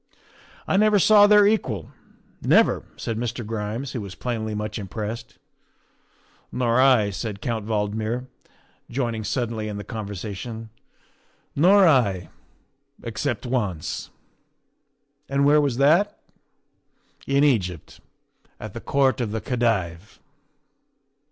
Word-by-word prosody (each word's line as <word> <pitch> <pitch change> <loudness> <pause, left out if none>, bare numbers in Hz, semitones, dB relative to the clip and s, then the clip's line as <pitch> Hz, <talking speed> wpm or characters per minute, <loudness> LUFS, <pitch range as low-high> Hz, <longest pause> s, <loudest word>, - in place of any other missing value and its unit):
' - - -25 0.2
I - - +2
never 210 0 +4
saw 205 +1 +6
their 210 -1 +6
equal 130 - 0 0.5
never," - - +4 0.2
said 115 -1 -3
Mr. 120 -1 -3
Grimes, 110 +4 -4
who 120 - -4
was 100 -2 -8
plainly 110 -3 -3
much 105 +1 -4
impressed. 105 +3 -6 0.6
" - - -36
Nor 120 0 +2
I," 125 -6 +4
said 100 +2 -5
Count 110 -1 -3
Valdmir, 110 +3 -2 0.6
joining 115 -3 -2
suddenly 115 -1 -2
in 105 -1 -5
the 105 - -6
conversation, 110 +1 -6 0.4
" - - -39
nor 185 +5 +6
I 100 - +2 0.7
except 120 +2 -3
once." 105 -11 -3 1.2
"And 140 0 +2
where 150 +1 +5
was 140 -5 0
that?" 170 +10 +3 0.6
" - - -31
In 140 - +4
Egypt, 95 - 0 0.6
at - - -8
the - - -7
Court 135 -3 +1
of 115 - -1
the 110 - -2
Khedive." 110 - -2
115 Hz, 125 wpm, -24 LUFS, 105-135 Hz, 1.2 s, saw